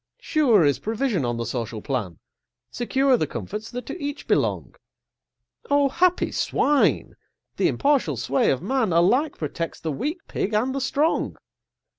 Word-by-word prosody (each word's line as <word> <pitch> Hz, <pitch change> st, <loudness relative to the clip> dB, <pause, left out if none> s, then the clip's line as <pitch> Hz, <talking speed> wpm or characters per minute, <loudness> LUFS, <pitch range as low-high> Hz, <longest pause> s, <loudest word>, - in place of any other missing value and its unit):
Sure 240 Hz, -, +3 dB
is 145 Hz, -1 st, +2 dB
provision 220 Hz, -, -1 dB
on 120 Hz, -1 st, -2 dB
the 115 Hz, -, -3 dB
social 115 Hz, -1 st, -4 dB
plan, 105 Hz, -, -3 dB, 0.5 s
Secure 265 Hz, +2 st, +2 dB
the -, -, -1 dB
comforts 210 Hz, +2 st, -6 dB
that 245 Hz, -1 st, -6 dB
to 285 Hz, +3 st, -7 dB
each 285 Hz, +1 st, -5 dB
belong: -, -, 0 dB, 1.0 s
Oh, 285 Hz, -1 st, +3 dB
happy 360 Hz, +5 st, +2 dB
Swine! 290 Hz, -1 st, +1 dB, 0.4 s
the -, -, +3 dB
impartial 275 Hz, -, +1 dB
sway 135 Hz, +4 st, +1 dB
of 135 Hz, +4 st, 0 dB
man 230 Hz, -1 st, 0 dB
Alike 240 Hz, -, +2 dB
protects 165 Hz, +2 st, -4 dB
the 160 Hz, -, -3 dB
weak 295 Hz, -, -3 dB
Pig 210 Hz, +2 st, -2 dB
and 250 Hz, +5 st, +1 dB
the 275 Hz, -, -2 dB
strong. 290 Hz, +4 st, 0 dB
230 Hz, 150 wpm, -24 LUFS, -, 1.0 s, Sure